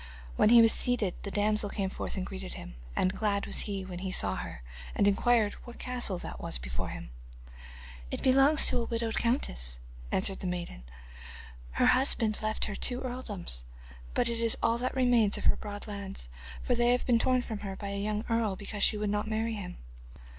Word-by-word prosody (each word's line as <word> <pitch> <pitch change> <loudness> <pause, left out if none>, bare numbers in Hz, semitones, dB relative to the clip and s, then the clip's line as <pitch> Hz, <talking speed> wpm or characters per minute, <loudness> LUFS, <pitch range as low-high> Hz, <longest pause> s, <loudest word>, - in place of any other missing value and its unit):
When - - +4
he 235 0 +8
was 225 - +5
seated 230 -7 0
the 200 - -5
damsel 210 +1 +1
came 195 -1 -2
forth - - -5
and 185 - -2
greeted 190 -1 -7
him, - - -8 0.2
and 185 - +1
glad 205 -2 0
was - - -2
he 195 -2 -3
when 180 -1 -7
he 190 0 -4
saw 100 - +2
her - - -7 0.3
and 200 - +3
inquired 215 +1 +3
what 240 -1 -11
castle 245 -7 -1
that - - -7
was - - -2
before - - -4
him. - - -8 1.0
'It - - -4
belongs 270 +4 +6
to 245 - +4
a - - -3
widowed 230 -1 -2
countess,' 60 - 0 0.3
answered 190 0 +3
the 185 - -3
maiden. 175 - -5 0.9
'Her - - +2
husband 240 -4 +3
left 215 0 0
her 210 - -4
two 250 +4 0
earldoms, 215 - -2 0.5
but - - +2
it 230 -1 -1
is 230 -1 +5
all 230 +1 +2
that 255 +2 -2
remains 245 -5 +3
of - - -6
her - - +4
broad 205 -1 -7
lands, 200 - -5 0.3
for 250 - +1
they 240 0 +3
have 250 - 0
been 240 -2 +3
torn 255 +1 +2
from 220 -4 -5
her 195 -2 -5
by 200 0 -6
a 200 0 -3
young 210 +2 -2
earl, 230 -4 0
because 205 +1 -6
she 215 - +4
would 210 -1 -1
not 210 +1 -1
marry 220 +1 -1
him. 185 -4 -6
210 Hz, 205 wpm, -30 LUFS, 195-235 Hz, 1.0 s, he